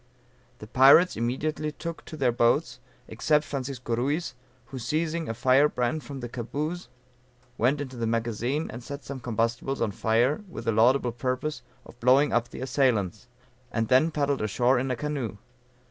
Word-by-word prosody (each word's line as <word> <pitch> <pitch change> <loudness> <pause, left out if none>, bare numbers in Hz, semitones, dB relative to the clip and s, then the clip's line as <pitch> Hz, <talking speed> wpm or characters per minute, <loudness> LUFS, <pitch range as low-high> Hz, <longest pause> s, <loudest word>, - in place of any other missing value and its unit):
The 105 - -10
pirates 135 +10 +6
immediately 145 +6 -2
took 165 +2 -7
to 155 - -9
their 130 -4 +2
boats, 120 +2 +1 0.3
except 150 +7 +1
Francisco 130 -4 -3
Ruiz 145 +8 -1 0.3
who 130 +2 -8
seizing 160 +6 -2
a 115 - -3
fire 130 +5 +4
brand 125 +5 -1
from 140 -2 -8
the 120 - -4
camboose 145 +8 -4 0.7
went 130 +6 +1
into 130 -3 -6
the 115 -1 -1
magazine 120 +6 -1
and 120 +1 -8
set 140 +2 -7
some 135 +2 -6
combustibles 120 +3 -1
on 115 -3 0
fire 115 - +1
with 115 -9 -8
the 115 - +2
laudable 120 +3 +3
purpose 130 +5 -3 0.2
of 120 - -15
blowing 130 +4 +4
up 120 0 +1
the - - -9
assailants, 120 -5 0 0.4
and 115 -1 -1
then 130 +6 +5
paddled 145 -3 0
ashore 120 +5 +2
in 130 +1 -2
a 125 - 0
canoe. 130 -6 -4
130 Hz, 165 wpm, -27 LUFS, 120-145 Hz, 0.7 s, pirates